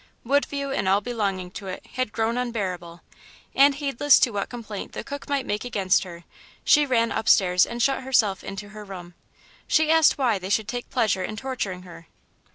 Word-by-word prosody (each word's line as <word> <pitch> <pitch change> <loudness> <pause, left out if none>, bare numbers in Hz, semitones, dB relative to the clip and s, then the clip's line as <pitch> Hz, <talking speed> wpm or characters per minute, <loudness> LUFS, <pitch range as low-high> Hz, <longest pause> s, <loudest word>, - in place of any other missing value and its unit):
Woodview 280 +1 0
and 195 -7 0
all 195 +1 +4
belonging 200 -5 -3
to 195 0 -8
it 185 - -7
had 255 -4 -2
grown 225 +2 -1
unbearable, 185 -9 -4 0.5
and 280 0 +5
heedless 285 0 +3
to 240 - +3
what 200 -2 -3
complaint 220 -4 -7
the - - -5
cook 285 0 -8
might 280 -2 0
make 210 +1 -2
against 200 -5 +1
her 175 -1 -10 0.4
she 295 -1 +4
ran 230 -3 +2
upstairs 180 -4 +3
and 235 0 -2
shut 270 -1 +1
herself 225 -7 +1
into 200 +1 -7
her 210 0 -10
room. 180 -3 -10 0.5
She 315 0 +3
asked 320 -1 +5
why 240 -7 +1
they 185 +1 -6
should 205 +1 +1
take 245 +2 -5
pleasure 215 -7 +1
in 215 - -4
torturing 215 -7 -4
her. 165 -2 -13
220 Hz, 185 wpm, -24 LUFS, 190-260 Hz, 0.5 s, and